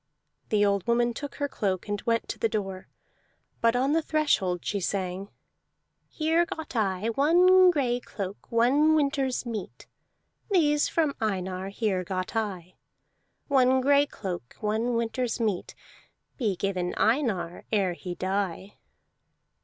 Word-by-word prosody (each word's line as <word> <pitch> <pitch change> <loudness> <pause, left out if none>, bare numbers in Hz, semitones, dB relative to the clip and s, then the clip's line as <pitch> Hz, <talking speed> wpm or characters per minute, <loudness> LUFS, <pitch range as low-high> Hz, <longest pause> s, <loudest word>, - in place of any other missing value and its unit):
The 205 -1 +3
old 200 -2 0
woman 235 0 +2
took 285 +4 -7
her 285 - -1
cloak, 195 -8 -2
and 205 -1 -2
went 230 0 +1
to - - -5
the 225 - +1
door, 195 -3 -4 0.7
but 230 +1 +3
on 265 +4 +2
the 325 - +3
threshold 250 - 0
she 205 - -1
sang: 190 +1 -3 0.8
"Here 320 +2 +1
got 320 -5 -7
I 205 -1 0
One 360 +8 +5
gray 255 -7 +1
cloak, 200 -3 -7
One 275 +7 +4
winter's 275 -4 0
meat: 220 -5 -6 0.6
These 295 -7 +3
from 310 -4 0
Einar 190 -2 -2
Here 200 -3 -1
got 185 +3 -4
I. 185 -5 -3 0.7
One 260 -2 +4
gray 285 +2 +4
cloak, 180 - -6
One 220 +3 0
winter's 230 +1 -1
meat, 210 -6 -2 0.6
Be 215 -8 0
given 180 -1 -2
Einar 215 - 0
Ere 195 -5 +1
he 175 0 -6
die!" 190 0 -3
225 Hz, 135 wpm, -27 LUFS, 190-275 Hz, 0.8 s, One